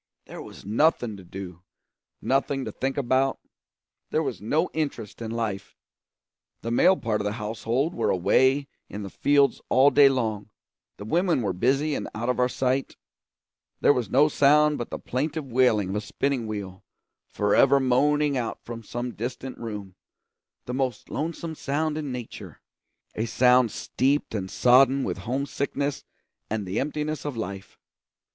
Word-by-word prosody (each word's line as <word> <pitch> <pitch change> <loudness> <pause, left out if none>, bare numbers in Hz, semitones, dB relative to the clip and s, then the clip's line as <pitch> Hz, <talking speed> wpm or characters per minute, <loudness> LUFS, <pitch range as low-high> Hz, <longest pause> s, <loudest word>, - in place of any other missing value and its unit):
There - - -9
was - - -12
nothing 120 0 +2
to 95 - -12
do, 90 -1 -9 0.6
nothing 135 0 0
to - - -4
think 135 +1 -3
about; 135 0 +1 0.7
there 160 - +1
was 125 - -4
no 155 +11 +1
interest 140 -9 -4
in 115 - -4
life. 110 -4 -4 0.9
The 115 - -3
male 185 +10 +5
part 110 -5 -1
of - - -4
the 105 - -1
household 115 - -2
were - - 0
away 130 +10 +3 0.2
in 105 - -6
the 100 - -7
fields 140 -2 +2
all 135 +2 +5
day, 145 -1 +7
the 110 -5 -4
women 165 - +1
were 100 -3 0
busy 135 - +1
and - - -3
out 120 +3 -2
of 125 - 0
our 125 0 +3
sight; 130 +1 -1 0.9
there - - +6
was 125 -4 -2
no 145 +4 +5
sound 150 +1 +4
but 120 - -4
the - - -4
plaintive 150 +4 -3
wailing 120 -6 +2
of 95 - -3
a - - -1
spinning 130 +1 -2
wheel, 100 -3 -6 0.4
forever 105 +7 +3
moaning 145 +3 +2
out 120 -3 -3
from 115 -1 -7
some 120 +2 -5
distant 125 +3 -5
room 105 -5 -6 0.7
the 125 - -5
most 130 -1 -2
lonesome 165 +2 -3
sound 150 +1 -2
in 150 -3 -4
nature, 125 -2 -8 0.5
a 110 - -2
sound 125 +1 +4
steeped 135 +6 -1
and 95 -3 -3
sodden 130 +4 +4
with - - -3
homesickness 140 +1 -2 0.5
and 105 -2 -2
the 95 +3 -2
emptiness 150 +2 -3
of 145 -5 -4
life. 100 -3 -6
125 Hz, 155 wpm, -25 LUFS, 110-140 Hz, 0.9 s, day